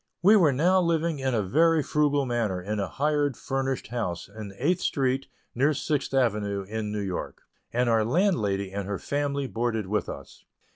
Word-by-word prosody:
We 205 +4 +7
were 170 -8 +5
now 180 +8 +3
living 165 -2 0
in 130 -2 0
a 110 - +1
very 160 - +3
frugal 145 -2 +1
manner 115 -7 -1
in 105 +4 -3
a 100 - -1
hired 145 0 0
furnished 135 -1 -2
house 110 -8 -3
in 100 0 -8
Eighth 175 +7 +1
Street, 135 -1 0 0.3
near 140 +5 +2
Sixth 145 +1 -1
Avenue, 105 -6 0
in 105 +1 -4
New 105 -1 -2
York, 95 -2 -5 0.3
and 125 +1 +1
our 115 -2 +3
landlady 110 - +1
and 100 -1 -4
her 100 -1 -2
family 140 +2 -2
boarded 115 -3 -1
with 105 +3 -1
us. 70 - -9
125 Hz, 180 wpm, -26 LUFS, 105-145 Hz, 0.3 s, We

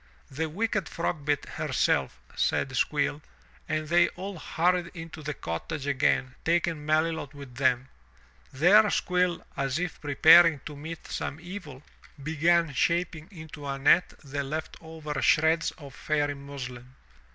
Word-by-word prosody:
'The 160 +4 -2
wicked 210 +1 -1
Frogbit 150 -4 -1
herself," - - 0 0.2
said 135 -1 0
Squill, 145 +2 0 0.5
and 155 0 -1
they 170 +2 +4
all 190 0 -6
hurried 175 +2 +1
into 165 -1 -8
the 150 -1 -4
cottage 135 - -5
again 135 -1 +1
taking 165 -2 0
Melilot 155 -1 0
with 140 -3 -10
them. 130 0 +1 0.6
There 195 +10 +5
Squill, 180 -2 0
as 135 +1 -1
if 175 -1 -4
preparing 160 +2 +6
to 150 - -7
meet 160 +3 -8
some 150 - -4
evil, 170 -6 -9 0.4
began 160 +1 +2
shaping 170 +2 0
into 155 -6 -10
a 135 0 -2
net 145 +6 +3
the 140 0 -3
left 155 +3 -5
over 160 -3 -5
shreds 160 +1 +3
of 140 -5 -11
Fairy 145 -1 -1
muslin. 130 -3 -9
155 Hz, 135 wpm, -27 LUFS, 140-170 Hz, 0.6 s, preparing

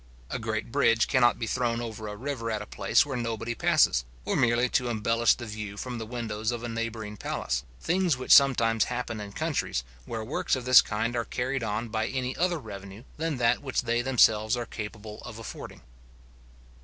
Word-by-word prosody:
A - - -2
great 110 0 -3
bridge 115 0 +3
cannot 120 -2 +4
be 115 - -3
thrown 120 0 0
over 110 -2 -5
a 105 - -5
river 120 0 -4
at 105 -2 -2
a - - -10
place - - +2
where 140 -2 -4
nobody 115 -1 -2
passes, 65 - +3 0.2
or - - 0
merely 120 +1 +3
to 125 0 +1
embellish 115 0 +2
the 120 - -7
view 105 -2 -6
from 125 +1 -5
the 110 - -6
windows 110 -2 -3
of 120 -1 -3
a - - -3
neighbouring 115 -2 -4
palace; 60 -8 -2 0.2
things 175 - +1
which 130 - -3
sometimes 115 -5 +6
happen 120 -3 -4
in 100 -1 -7
countries, - - -1 0.2
where 110 -1 -4
works 125 +5 0
of 130 -2 -5
this 125 -1 +9
kind 115 +3 -2
are 115 - 0
carried 130 +4 -2
on 110 +1 -2
by 110 0 -1
any 130 -1 -2
other 175 0 +1
revenue 100 -4 -9
than 160 -2 -2
that 120 -1 +2
which 135 -2 -1
they 120 0 +1
themselves 115 -3 +3
are 120 - -3
capable 105 -1 -7
of - - -9
affording. - - -8
115 Hz, 195 wpm, -28 LUFS, 110-125 Hz, 0.2 s, this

